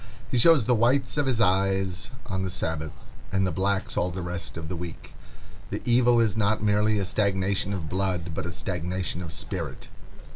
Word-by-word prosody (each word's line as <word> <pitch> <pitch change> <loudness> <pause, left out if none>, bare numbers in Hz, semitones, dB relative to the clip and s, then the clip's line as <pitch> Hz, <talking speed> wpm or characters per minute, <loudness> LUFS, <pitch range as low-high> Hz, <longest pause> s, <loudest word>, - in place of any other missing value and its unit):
He 125 - +2
shows 155 -3 +6
the 125 - +3
whites 125 +4 +2
of 145 -2 +1
his 125 -4 +1
eyes 95 -2 +1 0.2
on 95 -1 -2
the 95 - -1
Sabbath, 80 -4 -4 0.3
and 95 0 +2
the 95 - 0
blacks 95 +1 0
all 90 - +1
the 90 0 -5
rest 85 -1 -5
of 80 -1 -5
the 90 - -4
week. 85 -1 -8 0.6
The - - -4
evil 120 0 +4
is 110 -4 +2
not 110 0 +1
merely 105 +1 +3
a 100 - 0
stagnation 100 0 +1
of 90 -6 -3
blood, 90 -1 -1
but 85 - -3
a - - -4
stagnation 90 0 -3
of 85 -3 -6
spirit. 80 -4 -6
95 Hz, 190 wpm, -26 LUFS, 90-105 Hz, 0.6 s, shows